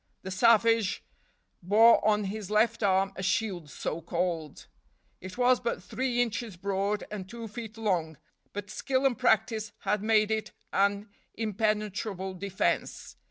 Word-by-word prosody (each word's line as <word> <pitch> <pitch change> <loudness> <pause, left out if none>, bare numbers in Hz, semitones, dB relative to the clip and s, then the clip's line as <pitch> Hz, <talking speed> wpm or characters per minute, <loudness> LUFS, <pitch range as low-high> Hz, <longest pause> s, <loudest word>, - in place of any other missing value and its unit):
The 190 - -5
savage 225 0 +3 0.6
bore 215 +6 +6
on 210 -1 +3
his 200 0 -5
left 225 +2 +2
arm 195 -1 +2
a - - -6
shield, 195 -5 -1
so 160 +3 -4
called; 170 -2 -3 0.5
it 185 +4 -9
was 250 0 +4
but 235 - -3
three 250 -2 0
inches 225 -4 -5
broad 200 +2 -1
and 195 -3 -6
two 230 0 -7
feet 220 0 -8
long, 175 -8 -1 0.3
but 205 -1 -6
skill 265 0 -1
and 265 -3 +3
practice 225 -3 +1
had 210 -1 0
made 215 0 +3
it 220 0 -2 0.2
an 200 +2 +1 0.3
impenetrable 210 -3 -2
defense. 195 +1 -2
210 Hz, 140 wpm, -29 LUFS, 190-225 Hz, 0.6 s, bore